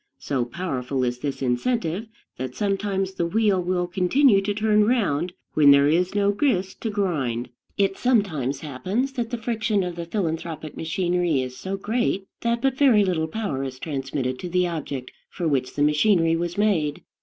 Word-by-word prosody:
So 130 Hz, -4 st, -1 dB
powerful 130 Hz, -3 st, -3 dB
is 125 Hz, 0 st, -1 dB
this 140 Hz, 0 st, -3 dB
incentive 170 Hz, -, -1 dB, 0.3 s
that 130 Hz, 0 st, -5 dB
sometimes 195 Hz, -1 st, -1 dB
the 170 Hz, -2 st, -1 dB
wheel 205 Hz, 0 st, +2 dB
will 180 Hz, 0 st, 0 dB
continue 195 Hz, +6 st, +3 dB
to 200 Hz, +1 st, -1 dB
turn 210 Hz, 0 st, +3 dB
round 185 Hz, -, +1 dB, 0.2 s
when 150 Hz, -2 st, +6 dB
there 140 Hz, 0 st, +7 dB
is 180 Hz, +5 st, +1 dB
no 200 Hz, 0 st, +3 dB
grist 200 Hz, -5 st, 0 dB
to 225 Hz, -, -1 dB
grind. 140 Hz, -, -1 dB, 0.3 s
It 195 Hz, -1 st, +1 dB
sometimes 160 Hz, -, +1 dB
happens 185 Hz, -, -2 dB
that 240 Hz, -4 st, -3 dB
the 240 Hz, -, -3 dB
friction 220 Hz, -3 st, 0 dB
of 180 Hz, -1 st, -4 dB
the 170 Hz, -1 st, -6 dB
philanthropic 165 Hz, -4 st, -3 dB
machinery 175 Hz, -2 st, 0 dB
is 130 Hz, -1 st, -4 dB
so 190 Hz, +6 st, -4 dB
great 205 Hz, -1 st, -1 dB
that 235 Hz, +1 st, -1 dB
but 270 Hz, -1 st, +1 dB
very 235 Hz, -8 st, +5 dB
little 165 Hz, -4 st, 0 dB
power 160 Hz, -7 st, -3 dB
is 130 Hz, -1 st, -5 dB
transmitted 135 Hz, -3 st, -3 dB
to 180 Hz, -, -5 dB
the 180 Hz, +1 st, +2 dB
object 145 Hz, -6 st, -4 dB, 0.2 s
for 170 Hz, -, -3 dB
which 135 Hz, -4 st, 0 dB
the 145 Hz, -, +2 dB
machinery 165 Hz, +2 st, +3 dB
was 175 Hz, +1 st, -3 dB
made. 175 Hz, -9 st, +1 dB
180 Hz, 175 wpm, -24 LUFS, 145-205 Hz, 0.3 s, there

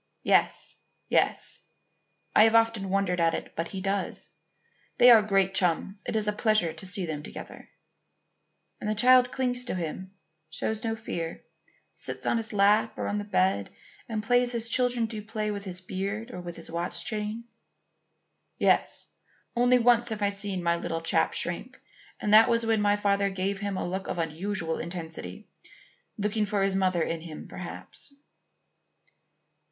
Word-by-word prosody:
"Yes; -, -, +2 dB, 0.3 s
yes. -, -, +1 dB, 0.8 s
I 215 Hz, -, +8 dB
have 225 Hz, 0 st, +3 dB
often 225 Hz, -4 st, +2 dB
wondered 190 Hz, -2 st, 0 dB
at 165 Hz, -1 st, +3 dB
it, -, -, -7 dB
but 165 Hz, +1 st, -2 dB
he 190 Hz, +1 st, -6 dB
does. 195 Hz, 0 st, -2 dB, 0.7 s
They 245 Hz, 0 st, +8 dB
are 225 Hz, -2 st, +8 dB
great 195 Hz, -2 st, +1 dB
chums. 190 Hz, +2 st, 0 dB
It -, -, -2 dB
is 215 Hz, -1 st, +1 dB
a 210 Hz, -, +1 dB
pleasure 215 Hz, -6 st, +2 dB
to 165 Hz, +4 st, -6 dB
see 190 Hz, 0 st, -1 dB
them 155 Hz, -3 st, -4 dB
together." -, -, -9 dB, 1.1 s
"And 210 Hz, -, -3 dB
the 215 Hz, -, 0 dB
child 250 Hz, +3 st, +6 dB
clings 250 Hz, -1 st, -1 dB
to 245 Hz, -, -3 dB
him 185 Hz, +2 st, -5 dB, 0.4 s
shows 220 Hz, +7 st, -3 dB
no 225 Hz, -1 st, -1 dB
fear 170 Hz, -7 st, -5 dB, 0.5 s
sits -, -, -5 dB
on -, -, +2 dB
his 225 Hz, -1 st, -4 dB
lap 205 Hz, +2 st, +3 dB
or -, -, -3 dB
on 205 Hz, -, -1 dB
the -, -, -3 dB
bed 185 Hz, -, +1 dB, 0.4 s
and 215 Hz, -2 st, -2 dB
plays 245 Hz, +2 st, +2 dB
as 230 Hz, 0 st, 0 dB
children 245 Hz, -1 st, +2 dB
do 220 Hz, -1 st, -5 dB
play 215 Hz, 0 st, -3 dB
with 200 Hz, -1 st, -5 dB
his 185 Hz, -1 st, -4 dB
beard 200 Hz, +5 st, -4 dB
or 180 Hz, -, -7 dB
with 175 Hz, -1 st, -7 dB
his 165 Hz, -, -8 dB
watch 170 Hz, 0 st, -2 dB
chain?" 215 Hz, +2 st, -3 dB, 1.1 s
"Yes. -, -, +1 dB, 0.5 s
Only 245 Hz, +1 st, +4 dB
once 240 Hz, 0 st, +3 dB
have 215 Hz, -2 st, -3 dB
I 200 Hz, -, +3 dB
seen 200 Hz, -2 st, -3 dB
my 170 Hz, 0 st, +2 dB
little 165 Hz, -1 st, -3 dB
chap 165 Hz, -, +2 dB
shrink, -, -, 0 dB, 0.4 s
and 210 Hz, -, 0 dB
that 220 Hz, +1 st, +8 dB
was 230 Hz, -1 st, +2 dB
when 225 Hz, -1 st, +2 dB
my 205 Hz, 0 st, +3 dB
father 200 Hz, -1 st, +1 dB
gave 195 Hz, +1 st, -2 dB
him 200 Hz, -2 st, -3 dB
a -, -, -2 dB
look 190 Hz, +2 st, -4 dB
of -, -, -3 dB
unusual 165 Hz, +1 st, -2 dB
intensity, 160 Hz, -, -7 dB, 0.7 s
looking 210 Hz, +1 st, 0 dB
for 200 Hz, -1 st, 0 dB
his 195 Hz, -1 st, +1 dB
mother 185 Hz, -3 st, +2 dB
in 165 Hz, 0 st, -3 dB
him 160 Hz, -2 st, -9 dB
perhaps." 280 Hz, -, -9 dB
200 Hz, 170 wpm, -27 LUFS, 180-220 Hz, 1.1 s, I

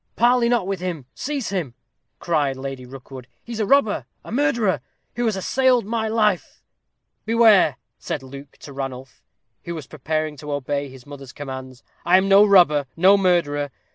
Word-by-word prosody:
"Parley 240 Hz, 0 st, +3 dB
not 240 Hz, -6 st, +1 dB
with 195 Hz, -1 st, -3 dB
him 175 Hz, -7 st, -5 dB
seize 280 Hz, -3 st, -4 dB
him!" 170 Hz, -11 st, -3 dB, 0.4 s
cried 145 Hz, -6 st, 0 dB
Lady 135 Hz, -1 st, -7 dB
Rookwood. 130 Hz, -1 st, -11 dB, 0.2 s
"He 240 Hz, -, -11 dB
is 225 Hz, -, -5 dB
a 215 Hz, -, 0 dB
robber, 275 Hz, -6 st, +2 dB, 0.2 s
a -, -, -10 dB
murderer, 235 Hz, -6 st, +1 dB, 0.3 s
who 240 Hz, +1 st, -1 dB
has 220 Hz, -3 st, +1 dB
assailed 250 Hz, +4 st, +2 dB
my 220 Hz, +1 st, -2 dB
life." 215 Hz, -4 st, 0 dB, 0.6 s
"Beware!" 220 Hz, -, +5 dB, 0.2 s
said 135 Hz, -, -4 dB
Luke 140 Hz, +1 st, -12 dB
to 140 Hz, -, -10 dB
Ranulph, 135 Hz, -2 st, -7 dB, 0.4 s
who 170 Hz, -, -5 dB
was 155 Hz, -4 st, -7 dB
preparing 155 Hz, +1 st, -3 dB
to 150 Hz, +1 st, -6 dB
obey 145 Hz, 0 st, -3 dB
his 130 Hz, -1 st, -14 dB
mother's 140 Hz, -3 st, -11 dB
commands; 130 Hz, -2 st, -8 dB, 0.2 s
"I 175 Hz, +2 st, +5 dB
am 190 Hz, +1 st, +1 dB
no 195 Hz, +1 st, +7 dB
robber 175 Hz, -9 st, +4 dB
no 190 Hz, +4 st, +6 dB
murderer. 170 Hz, -7 st, +1 dB
170 Hz, 170 wpm, -22 LUFS, 140-215 Hz, 0.6 s, no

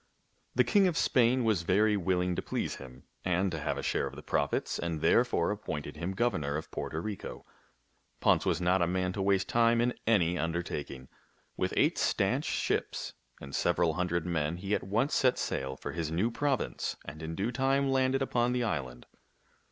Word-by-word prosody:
The -, -, +5 dB
king 200 Hz, -3 st, +4 dB
of 170 Hz, -3 st, -1 dB
Spain 125 Hz, 0 st, +3 dB
was 110 Hz, -6 st, +2 dB
very 105 Hz, +5 st, +3 dB
willing 90 Hz, -1 st, 0 dB
to -, -, -2 dB
please -, -, -3 dB
him 65 Hz, -1 st, -12 dB, 0.2 s
and 90 Hz, +1 st, +1 dB
to 80 Hz, -, -3 dB
have 70 Hz, -, -2 dB
a -, -, -4 dB
share -, -, 0 dB
of -, -, -9 dB
the -, -, -10 dB
profits, 70 Hz, 0 st, -1 dB
and 85 Hz, -2 st, -2 dB
therefore 115 Hz, -1 st, +3 dB
appointed 75 Hz, -8 st, -5 dB
him 85 Hz, +5 st, -3 dB
governor 80 Hz, -10 st, 0 dB
of 80 Hz, -, -7 dB
Porto 80 Hz, -, -4 dB
Rico. 100 Hz, +3 st, -6 dB, 0.7 s
Ponce -, -, +3 dB
was -, -, +1 dB
not 90 Hz, +1 st, +2 dB
a 85 Hz, -, +3 dB
man 90 Hz, +1 st, 0 dB
to 100 Hz, -, -3 dB
waste 95 Hz, -1 st, +2 dB
time 115 Hz, 0 st, +3 dB
in 120 Hz, +1 st, +2 dB
any 90 Hz, -6 st, +3 dB
undertaking. 75 Hz, -6 st, -3 dB, 0.5 s
With -, -, -1 dB
eight -, -, +3 dB
stanch -, -, +1 dB
ships -, -, -1 dB, 0.3 s
and 70 Hz, 0 st, -10 dB
several 85 Hz, -2 st, +2 dB
hundred 85 Hz, 0 st, -1 dB
men, 85 Hz, -2 st, -1 dB
he 95 Hz, +3 st, -3 dB
at -, -, +1 dB
once 110 Hz, +9 st, 0 dB
set 130 Hz, -2 st, +3 dB
sail 65 Hz, 0 st, -3 dB
for -, -, -5 dB
his 80 Hz, -2 st, -3 dB
new 95 Hz, +9 st, 0 dB
province 140 Hz, +1 st, -1 dB
and 75 Hz, -, -8 dB
in 80 Hz, +1 st, -5 dB
due 105 Hz, +7 st, -1 dB
time 135 Hz, +2 st, +1 dB
landed 135 Hz, 0 st, +2 dB
upon 120 Hz, -1 st, +1 dB
the 125 Hz, -1 st, 0 dB
island. 65 Hz, -, -3 dB
95 Hz, 190 wpm, -30 LUFS, 80-115 Hz, 0.7 s, The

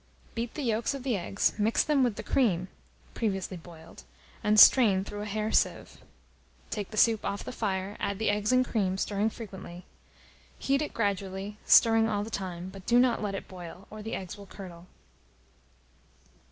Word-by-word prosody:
Beat 230 Hz, 0 st, -4 dB
the 300 Hz, -, -3 dB
yolks 230 Hz, +2 st, 0 dB
of 270 Hz, -, -7 dB
the 255 Hz, -4 st, 0 dB
eggs, 195 Hz, +2 st, 0 dB
mix 215 Hz, +2 st, +2 dB
them 290 Hz, -3 st, +2 dB
with 240 Hz, -4 st, +1 dB
the -, -, -6 dB
cream 185 Hz, -8 st, +1 dB, 0.4 s
(previously 195 Hz, -4 st, -2 dB
boiled), 165 Hz, -1 st, -13 dB, 0.4 s
and 210 Hz, 0 st, +4 dB
strain 205 Hz, -8 st, +7 dB
through 205 Hz, +1 st, -7 dB
a 210 Hz, -, -5 dB
hair 215 Hz, +1 st, -2 dB
sieve; -, -, 0 dB, 0.7 s
take 205 Hz, -3 st, -3 dB
the 215 Hz, -, -8 dB
soup 225 Hz, 0 st, +4 dB
off 200 Hz, 0 st, -3 dB
the -, -, -6 dB
fire, 200 Hz, -4 st, -3 dB
add 200 Hz, -, -2 dB
the 220 Hz, 0 st, +1 dB
eggs 210 Hz, +2 st, 0 dB
and 255 Hz, 0 st, +4 dB
cream, 195 Hz, -6 st, -1 dB
stirring 205 Hz, +2 st, 0 dB
frequently. 190 Hz, -5 st, -9 dB, 0.7 s
Heat 275 Hz, +1 st, +1 dB
it 300 Hz, -, -4 dB
gradually, 200 Hz, -1 st, -2 dB
stirring 225 Hz, -1 st, +6 dB
all 205 Hz, -1 st, -1 dB
the 220 Hz, -, -8 dB
time; 185 Hz, -3 st, -5 dB
but 190 Hz, 0 st, -12 dB
do 240 Hz, -, +4 dB
not 245 Hz, -1 st, +3 dB
let 205 Hz, -2 st, -2 dB
it -, -, -6 dB
boil, 180 Hz, +1 st, -10 dB
or 215 Hz, 0 st, -8 dB
the 220 Hz, +1 st, -4 dB
eggs 190 Hz, +2 st, -7 dB
will 200 Hz, -, -11 dB
curdle. 180 Hz, -3 st, -11 dB
205 Hz, 180 wpm, -29 LUFS, 190-225 Hz, 0.7 s, strain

